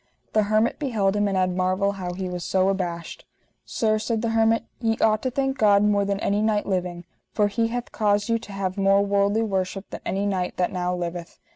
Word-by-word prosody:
The 215 Hz, -1 st, +3 dB
hermit 215 Hz, +2 st, +2 dB
beheld 215 Hz, -9 st, 0 dB
him 205 Hz, 0 st, +2 dB
and 195 Hz, -1 st, 0 dB
had 185 Hz, -1 st, +1 dB
marvel 185 Hz, +2 st, +1 dB
how 185 Hz, -3 st, -5 dB
he 185 Hz, +1 st, -4 dB
was 180 Hz, -1 st, -5 dB
so 190 Hz, +2 st, +2 dB
abashed. 175 Hz, -3 st, -3 dB, 0.4 s
Sir, 215 Hz, -1 st, 0 dB
said 225 Hz, +1 st, -2 dB
the 230 Hz, -, 0 dB
hermit, 225 Hz, 0 st, +3 dB, 0.2 s
ye 225 Hz, -2 st, 0 dB
ought 215 Hz, -1 st, +3 dB
to 260 Hz, -, -1 dB
thank 270 Hz, +1 st, -1 dB
God 205 Hz, -2 st, +5 dB
more 205 Hz, -1 st, +2 dB
than 200 Hz, 0 st, -1 dB
any 205 Hz, +1 st, +1 dB
knight 215 Hz, -1 st, +1 dB
living, 180 Hz, -2 st, -2 dB, 0.3 s
for 210 Hz, -1 st, +3 dB
He 225 Hz, +3 st, 0 dB
hath 240 Hz, +1 st, -4 dB
caused 205 Hz, -1 st, +1 dB
you 230 Hz, -1 st, +1 dB
to 215 Hz, -, -11 dB
have 195 Hz, -1 st, -3 dB
more 195 Hz, +1 st, +4 dB
worldly 200 Hz, +2 st, +2 dB
worship 195 Hz, -1 st, -2 dB
than -, -, -7 dB
any 195 Hz, +1 st, -1 dB
knight 185 Hz, -3 st, -2 dB
that 180 Hz, -, +1 dB
now 180 Hz, -1 st, -1 dB
liveth. 175 Hz, -1 st, -5 dB
200 Hz, 220 wpm, -24 LUFS, 185-220 Hz, 0.4 s, God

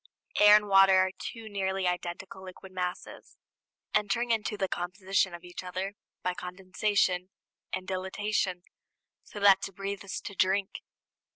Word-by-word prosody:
Air 210 Hz, 0 st, +9 dB
and 210 Hz, 0 st, +3 dB
water 195 Hz, -1 st, +7 dB
are 185 Hz, 0 st, +3 dB
two 225 Hz, -1 st, -7 dB
nearly 190 Hz, -2 st, -1 dB
identical 180 Hz, +2 st, -4 dB
liquid 185 Hz, 0 st, -11 dB
masses, 180 Hz, -1 st, -5 dB, 0.6 s
entering 210 Hz, +3 st, +1 dB
into 215 Hz, -1 st, 0 dB
the 190 Hz, -, 0 dB
composition 185 Hz, +1 st, -1 dB
of 170 Hz, -, -12 dB
each 175 Hz, +1 st, -8 dB
other 185 Hz, +2 st, -4 dB, 0.3 s
by 180 Hz, -, 0 dB
condensation 185 Hz, 0 st, 0 dB, 0.4 s
and 185 Hz, 0 st, -4 dB
dilatation, 190 Hz, -1 st, -1 dB, 0.6 s
so 205 Hz, -, -9 dB
that 200 Hz, -1 st, +6 dB
to 195 Hz, -, -4 dB
breathe 195 Hz, +1 st, -5 dB
is 195 Hz, -, -4 dB
to 200 Hz, -, -7 dB
drink. 190 Hz, +1 st, +1 dB
190 Hz, 145 wpm, -29 LUFS, 185-200 Hz, 0.6 s, Air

